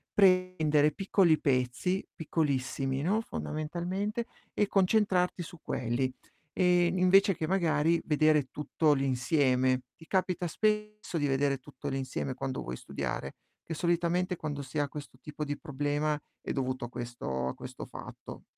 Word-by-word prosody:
prendere 185 -6 +4
piccoli 190 -4 +3
pezzi, 130 +8 0
piccolissimi, 135 -4 -1
no, 195 +8 +2
fondamentalmente, 185 +7 -3 0.3
e 210 - +2
concentrarti 190 -3 +2
su 175 0 -11
quelli, 120 +2 -1 0.4
ehm, 180 -1 +3
invece 195 +1 +5
che 160 - -2
magari 165 -3 +2
vedere 155 -1 +4
tutto 150 +1 +2
l'insieme. 130 -1 +2 0.2
Ti 160 - -15
capita 180 -2 0
spesso 210 0 -1
di 145 -2 +1
vedere 140 0 +2
tutto 145 +2 -8
l'insieme 135 0 -2
quando 130 0 -3
vuoi 60 +1 -5
studiare? - - -4 0.3
Che 165 - -5
solitamente 175 +2 +1
quando 145 -3 -4
si 135 +2 -4
ha 145 - +1
questo 140 -2 -9
tipo 150 +1 -5
di 145 -1 -3
problema 145 0 -1 0.2
è - - -4
dovuto 130 -2 -2
a - - -8
questo 120 - -4
a - - -2
questo - - -8
fatto. - - -10
155 Hz, 140 wpm, -30 LUFS, 135-180 Hz, 0.4 s, invece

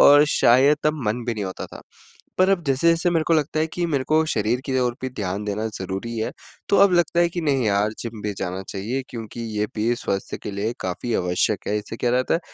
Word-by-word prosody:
और 145 +1 +8
शायद 135 +5 +5
तब 155 -3 +1
मन 115 +3 -1
भी 120 -2 -1
नहीं 105 -2 -3
होता 95 - -5
था। - - -11 0.6
पर 185 +1 +5
अब 190 -3 +2
जैसे-जैसे 165 +6 +2
मेरे 165 -2 +1
को 165 - +5
लगता 155 0 +1
है 160 - +2
कि 175 - -1
मेरे 140 -5 0
को 155 +1 +4
शरीर 110 +3 0
की 130 -1 0
ओर 120 -1 +1
पे 130 - -2
ध्यान 100 -3 -3
देना 105 +2 -2
ज़रूरी 95 +5 -4
है, 110 - -1 0.4
तो - - +4
अब 200 -2 +6
लगता 175 0 +2
है 170 - +4
कि 175 - -3
नहीं 135 -5 +1
यार, 100 +1 +2
जिम 115 -2 -6
भी 105 -1 -2
जाना 95 +1 -3
चाहिए 115 +7 -3
क्योंकि 115 -1 -7 0.2
ये 105 - +1
भी 115 +3 +1
स्वास्थ्य 100 -5 -3
के - - -4
लिए 100 +3 -2
काफ़ी 95 +6 -3
आवश्यक 90 +3 0
है। 105 - +1
इससे 105 +2 -7
क्या 120 - 0
रहता 125 +4 +2
है, 170 - +1
120 Hz, 240 wpm, -23 LUFS, 105-150 Hz, 0.6 s, और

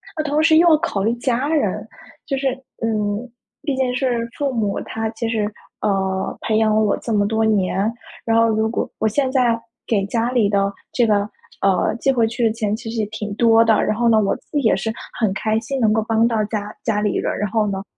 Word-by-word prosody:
那 310 - -1
同 300 0 +1
时 315 0 +5
又 340 +2 +6
要 315 - +6
考 255 - -2
虑 225 +3 +2
家 250 +3 -1
人。 310 -3 0 0.4
就 275 - -2
是， 270 - 0 0.3
嗯， 215 +1 -1 0.3
毕 285 -4 -1
竟 260 -1 0
是 245 -3 0
父 280 -2 -1
母， 210 -4 -1
他 225 0 -3
其 225 +1 -4
实， 220 -2 -1 0.3
呃， 190 -1 -1
培 220 - 0
养 220 -1 +3
了 215 - +3
我 210 -2 +2
这 230 - -5
么 205 -1 +2
多 220 +1 0
年， 200 0 +1 0.3
然 225 0 +2
后 230 - +5
如 220 0 +1
果 230 - -2
我 220 - +2
现 265 +4 0
在 245 -3 +2 0.3
给 200 -4 +1
家 230 +3 0
里 235 -5 +3
的 200 -1 +1 0.2
这 240 - +3
个， 205 -1 +1 0.3
呃， 195 0 +2
寄 275 - +1
回 235 -3 +2
去 230 +1 -1
的 220 - +2
钱 215 -2 -1
其 225 +1 -7
实 225 0 -2
也 210 - 0
挺 210 -1 -5
多 230 0 +5
的。 220 -2 +3
然 215 - 0
后 240 0 +2
呢， 220 -2 +5
我 200 - +1
自 - - -28
己 295 - +2
也 220 - +3
是 210 +4 -2 0.3
很 220 -5 +2
开 215 +3 0
心 265 +4 -4
能 220 - +4
够 220 +1 +2
帮 225 0 +3
到 225 -2 0
家 210 -1 -4
家 210 -3 0
里 210 -1 0
人。 - - -1
然 210 -1 -1
后 220 0 +1
呢， 195 -1 -3
225 Hz, 255 characters per minute, -20 LUFS, 210-240 Hz, 0.4 s, 又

